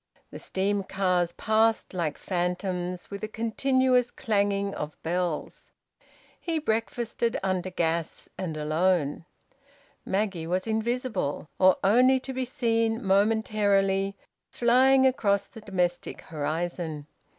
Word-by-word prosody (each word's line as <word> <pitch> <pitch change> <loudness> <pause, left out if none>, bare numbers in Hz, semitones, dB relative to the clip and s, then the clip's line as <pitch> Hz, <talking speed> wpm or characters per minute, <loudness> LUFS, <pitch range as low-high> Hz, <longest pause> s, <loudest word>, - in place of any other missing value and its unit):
The - - -8
steam 200 +1 -1
cars 180 -3 0
passed 220 +3 +1
like 165 -5 -2
phantoms, 180 0 -3
with 200 +1 -6
a - - -1
continuous 250 +3 +1
clanging 200 -4 0
of 150 0 -5
bells. 175 -1 -3 0.7
He 335 -2 -2
breakfasted 230 -3 -1
under 185 -1 -1
gas 165 -2 -2
and 165 -4 -4
alone. 155 0 0 0.8
Maggie 190 -4 -1
was 185 +2 -1
invisible, 220 - -2
or 185 0 +6
only 255 +6 +5
to 265 - -6
be 260 0 -2
seen 230 -3 0
momentarily, 200 -1 +2 0.3
flying 260 +3 +4
across 205 -6 +2
the 225 - -13
domestic 180 -4 -2
horizon. 160 0 -3
200 Hz, 110 wpm, -27 LUFS, 180-230 Hz, 0.8 s, or